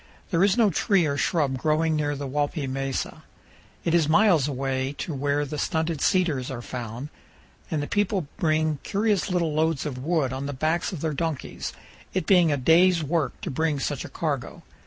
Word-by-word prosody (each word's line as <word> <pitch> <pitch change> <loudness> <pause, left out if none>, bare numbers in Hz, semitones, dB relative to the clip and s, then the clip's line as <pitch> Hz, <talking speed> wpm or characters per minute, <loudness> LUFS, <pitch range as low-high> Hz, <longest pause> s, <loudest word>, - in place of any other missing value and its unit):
There 170 0 +3
is 200 +3 +3
no 220 -4 +4
tree 185 +2 +2
or 140 -2 0
shrub 140 -2 0
growing 155 +2 +1
near 145 -1 0
the 140 0 -5
Walpi 145 +2 -1
mesa. 135 0 -3 0.6
It 165 - 0
is 165 -3 +3
miles 170 -5 +4
away 135 -1 -2
to 155 - -5
where 145 +1 0
the 150 +1 -5
stunted 160 0 -1
cedars 160 -9 +1
are 125 -3 -5
found, 120 +3 -6 0.6
and 155 -3 -1
the - - -4
people 205 -4 0
bring 155 -5 +1
curious 205 0 0
little 170 -4 0
loads 160 -1 +1
of 135 -4 -4
wood 155 -5 +1
on 135 +1 -4
the 145 - -3
backs 155 +7 0
of 175 -6 -6
their 160 -2 -1
donkeys, 160 -1 -3 0.4
it 185 -4 0
being 175 -5 +5
a 145 - +1
day's 165 +5 +4
work 155 -1 -1
to - - -4
bring 155 +1 0
such - - -2
a - - -8
cargo. - - -3
155 Hz, 190 wpm, -25 LUFS, 140-170 Hz, 0.6 s, being